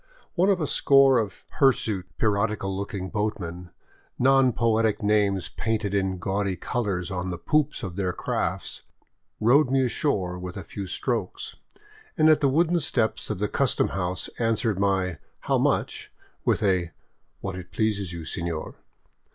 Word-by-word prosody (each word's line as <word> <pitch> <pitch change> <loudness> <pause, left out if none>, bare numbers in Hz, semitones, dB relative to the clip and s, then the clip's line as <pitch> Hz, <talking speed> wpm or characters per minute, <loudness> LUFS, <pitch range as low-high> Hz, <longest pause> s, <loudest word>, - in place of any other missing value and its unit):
One 185 +2 +3
of 195 -2 +3
a 155 - 0
score 135 -2 +5
of 105 -3 -4 0.2
hirsute, 110 - +2
pirati 105 0 +1
cal 95 0 -3
looking 95 -1 -4
boatmen, 90 -5 -3 0.5
neo 135 0 +4
poetic 110 -2 +1
names 100 -3 +2
painted 110 -3 -2
in 95 -2 0
gaudy 95 +1 -1
colors 95 -3 -2
on 90 0 -3
the 90 -1 -3
poops 150 - 0
of 90 -4 -5
their 95 -2 -1
crafts, - - -3 0.6
rowed 130 +5 +4
me 135 0 +3
ashore 95 -9 -1
with 90 +1 -6
a 95 - -6
few 100 +3 -7
strokes, - - -3 0.6
and 155 0 +5
at 155 -1 +5
the 140 -2 +3
wooden 170 +5 +2
steps 120 -7 0
of - - -2
the - - 0
custom - - +1
house 90 -1 -2
answered 115 -3 +1
my 95 -5 0
" - - -43
How - - +1
much? - - -1 0.2
" - - -38
with - - +2
a 90 -4 +1 0.2
" - - -44
What 95 -2 -4
it 90 -1 -9
pleases 105 -5 -1
you, 85 -2 -7
senor." 85 -1 -4
100 Hz, 165 wpm, -25 LUFS, 95-120 Hz, 0.6 s, score